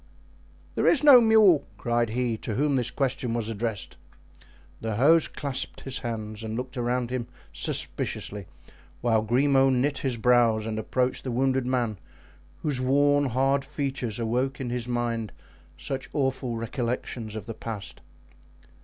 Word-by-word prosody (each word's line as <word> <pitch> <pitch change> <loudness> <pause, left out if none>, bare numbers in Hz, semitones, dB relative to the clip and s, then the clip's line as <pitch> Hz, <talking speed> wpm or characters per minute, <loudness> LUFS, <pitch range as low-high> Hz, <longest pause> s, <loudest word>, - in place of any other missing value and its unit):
"There - - +1
is 300 - +4
no 275 -5 +9
mule," 220 -8 +5
cried 120 -1 0
he 120 0 -1
to 110 - -4
whom 145 +2 +1
this 120 -2 0
question 130 -3 -1
was 115 -2 -2
addressed. 110 -2 -4 0.8
The 110 -1 -2
host 155 +8 +4
clasped 140 -3 -3
his 135 0 -4
hands 110 -2 -5
and 110 0 -4
looked 125 +2 -5
around 120 0 -1
him 125 -2 -3 0.3
suspiciously, 100 -3 -2 0.6
whilst 110 -2 +2
Grimaud 135 +2 +4
knit 135 +2 +1
his 130 -3 -1
brows 115 -2 +3
and 110 -1 -3
approached 125 +3 -1
the 130 - -4
wounded 130 +1 +1
man, 120 -6 -1 0.6
whose 140 -4 -1
worn, 145 +2 +3
hard 135 +3 +1
features 135 -7 -3
awoke 125 +5 -1
in 125 -3 -3
his 120 -1 -3
mind 120 -3 -2 0.5
such 135 -1 -5
awful 130 -4 -1
recollections 115 -1 -4
of 110 - -6
the 115 - -5
past. 110 -3 -7
125 Hz, 145 wpm, -26 LUFS, 115-135 Hz, 0.8 s, no